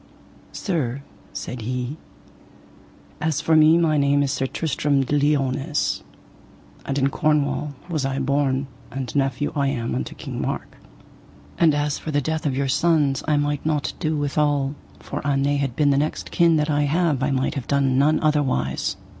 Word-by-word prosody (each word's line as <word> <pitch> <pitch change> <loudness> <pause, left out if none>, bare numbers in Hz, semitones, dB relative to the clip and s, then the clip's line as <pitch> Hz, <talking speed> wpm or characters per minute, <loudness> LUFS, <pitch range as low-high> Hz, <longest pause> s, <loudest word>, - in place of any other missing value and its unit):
Sir, 140 - -2 0.3
said 125 -1 -6
he, 125 +5 -3 1.2
as 160 -3 0
for 160 - +2
me 155 +1 +6
my 160 -3 +2
name 140 0 +3
is 135 - 0
Sir 135 -1 -1
Tristram 140 -2 0
de 145 - -1
Liones, 145 +1 +1 0.9
and 135 - -1
in 135 0 +2
Cornwall 150 -1 0
was 160 -5 -2
I 135 0 -1
born, 135 0 +1 0.2
and 130 -3 -5
nephew 135 0 0
I 140 -1 +1
am 120 - -2
unto 65 0 -3
King - - -6
Mark. - - -4 0.8
And 160 -3 +5
as 145 0 -1
for - - -7
the 145 -1 +1
death 155 +2 -2
of 135 -2 -1
your 140 0 0
sons 145 -1 +2
I 150 -1 +3
might 145 0 -1
not 150 -2 -1
do 155 -1 0
withal, 145 -1 +1 0.3
for - - -5
an 140 -1 +1
they 145 +1 +2
had 135 -4 -2
been 145 -1 +3
the 140 - +3
next 150 +2 -3
kin 170 -1 +4
that 150 0 +1
I 145 0 +2
have 155 -2 +1
I 135 - +1
might 135 -1 0
have 135 -4 -5
done 135 -2 +2
none 155 +2 +3
otherwise. 130 - 0
145 Hz, 175 wpm, -23 LUFS, 135-150 Hz, 1.2 s, me